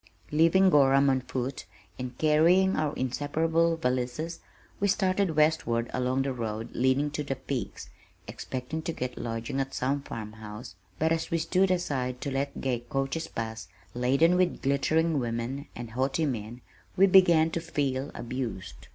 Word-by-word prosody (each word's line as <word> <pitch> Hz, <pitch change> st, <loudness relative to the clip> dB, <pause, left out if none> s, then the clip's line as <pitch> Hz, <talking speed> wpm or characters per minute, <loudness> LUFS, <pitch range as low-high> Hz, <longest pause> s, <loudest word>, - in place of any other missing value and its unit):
Leaving 165 Hz, +5 st, +5 dB
Gorham 140 Hz, -1 st, +5 dB
on 130 Hz, -1 st, +1 dB
foot, 130 Hz, +1 st, -4 dB, 0.3 s
and 125 Hz, -1 st, -6 dB
carrying 170 Hz, +5 st, +4 dB
our 155 Hz, -2 st, 0 dB
inseparable 160 Hz, +6 st, 0 dB
valises, 130 Hz, +4 st, -2 dB, 0.4 s
we 200 Hz, -, +2 dB
started 190 Hz, -3 st, +1 dB
westward 150 Hz, -7 st, +2 dB
along 130 Hz, +1 st, 0 dB
the 135 Hz, -1 st, -2 dB
road 115 Hz, -1 st, -4 dB
leading 130 Hz, +4 st, +1 dB
to 150 Hz, 0 st, -3 dB
the 135 Hz, -1 st, -3 dB
peaks, 130 Hz, -4 st, -5 dB, 0.4 s
expecting 130 Hz, +5 st, -5 dB
to 165 Hz, -, -3 dB
get 125 Hz, -3 st, -4 dB
lodging 115 Hz, +4 st, -4 dB
at 135 Hz, 0 st, -3 dB
some 140 Hz, +3 st, 0 dB
farm 110 Hz, -5 st, -7 dB
house, 110 Hz, +1 st, -9 dB, 0.2 s
but 160 Hz, +1 st, +1 dB
as 165 Hz, 0 st, 0 dB
we 165 Hz, -, +1 dB
stood 180 Hz, +4 st, +2 dB
aside 135 Hz, -9 st, -1 dB
to 140 Hz, -, -3 dB
let 140 Hz, +1 st, -2 dB
gay 130 Hz, -3 st, 0 dB
coaches 135 Hz, +6 st, -3 dB
pass 110 Hz, -1 st, -5 dB, 0.3 s
laden 135 Hz, +8 st, +3 dB
with 180 Hz, -1 st, +1 dB
glittering 155 Hz, +3 st, +2 dB
women 120 Hz, +4 st, -3 dB
and 120 Hz, -1 st, -7 dB
haughty 135 Hz, +6 st, 0 dB
men, 120 Hz, -2 st, -4 dB, 0.4 s
we 195 Hz, -, +7 dB
began 175 Hz, -4 st, +5 dB
to 165 Hz, -, -2 dB
feel 140 Hz, -4 st, -2 dB
abused. 120 Hz, -6 st, -5 dB
135 Hz, 155 wpm, -28 LUFS, 125-160 Hz, 0.4 s, we